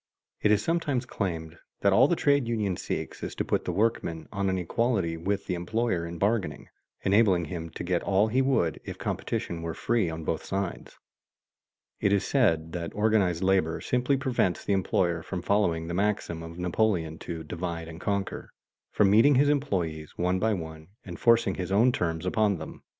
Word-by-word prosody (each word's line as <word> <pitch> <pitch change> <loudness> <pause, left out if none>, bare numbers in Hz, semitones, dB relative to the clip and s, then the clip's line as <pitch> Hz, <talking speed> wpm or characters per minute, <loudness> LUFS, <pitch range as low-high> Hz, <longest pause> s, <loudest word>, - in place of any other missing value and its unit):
It 105 - +3
is 105 0 +3
sometimes 150 -7 0
claimed 85 -8 -4 0.2
that 100 -1 +4
all 125 +7 +6
the 175 - +2
trade 140 -5 +2
union 105 -5 0
seeks - - -5
is - - -5
to - - -2
put - - 0
the - - -1
workman 100 -7 -1
on 100 -1 -1
an 95 - 0
equality 95 -1 0
with 100 +4 -2
the 90 - -2
employer 90 0 -1
in 85 0 -7
bargaining, 100 +1 -1 0.3
enabling 95 -4 +3
him 85 +1 -5
to - - -7
get 90 -1 0
all 100 +2 +2
he 125 +4 +2
would 130 - +1
if - - -7
competition 85 -1 -3
were 80 -1 -4
free 115 -7 +1
on 80 0 -5
both 80 - -2
sides. 95 -2 -4 1.0
It 100 - +2
is 100 -1 +2
said 80 - +2
that 85 -1 -5
organized 105 -5 +2
labor 95 -4 +2
simply 125 +2 +1
prevents 125 -9 0
the 100 - +1
employer 85 -2 +1
from 90 +1 -5
following 85 -6 +1
the 85 - -4
maxim 95 -4 -1
of 80 +1 -9
Napoleon 90 -3 0
to 85 -2 -6
"divide 85 +1 -4
and 85 +1 -9
conquer," 100 -1 -2 0.4
from 100 -2 +3
meeting 125 +7 +6
his 145 +3 +4
employees 90 - -1
one 90 +1 +1
by 110 +1 +2
one 80 -2 -8 0.2
and 90 -4 -8
forcing 115 -4 +4
his 95 0 -4
own 115 +6 +5
terms 80 -6 -2
upon 105 0 +2
them. 80 - -9
95 Hz, 185 wpm, -27 LUFS, 85-110 Hz, 1.0 s, all